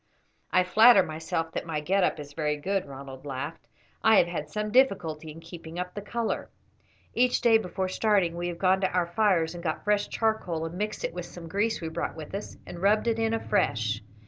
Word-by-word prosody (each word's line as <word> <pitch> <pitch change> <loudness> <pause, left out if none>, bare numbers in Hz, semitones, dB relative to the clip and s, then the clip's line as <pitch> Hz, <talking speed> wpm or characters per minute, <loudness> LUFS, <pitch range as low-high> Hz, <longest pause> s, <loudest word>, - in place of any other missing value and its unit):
"I 185 - +4
flatter 215 +2 +7
myself 160 +1 -3
that - - -4
my 155 -2 -1
get 190 +6 +1
up 170 - +1
is 145 -1 -9
very 150 -1 -1
good," 190 +3 -1
Ronald 135 -1 -9
laughed. 140 +3 -6 0.3
"I 220 0 +6
have 175 - +6
had 160 -3 -5
some 210 0 -3
difficulty 180 - +2
in 160 +2 -10
keeping 165 0 -10
up 180 0 -4
the 205 - -5
colour. 230 +2 -3 0.6
Each 250 +1 +3
day 225 -2 +5
before 190 -1 -3
starting 190 -3 +2
we 175 0 -3
have 175 -1 -4
gone 190 +1 +3
to 190 - +2
our 180 -1 +1
fires 170 -3 +2
and 175 -1 -8
got 160 - -2
fresh 205 -1 +1
charcoal 185 -8 -1
and 165 +1 -6
mixed 210 +3 -3
it - - -2
with 175 0 -5
some 175 -1 -10
grease 205 +5 0
we 165 - -3
brought 160 +1 -3
with 155 +1 -9
us 200 +1 -6
and 175 - -8
rubbed 210 +4 +3
it 230 -1 +1
in 225 0 +1
afresh." 110 - 0
175 Hz, 215 wpm, -27 LUFS, 160-210 Hz, 0.6 s, flatter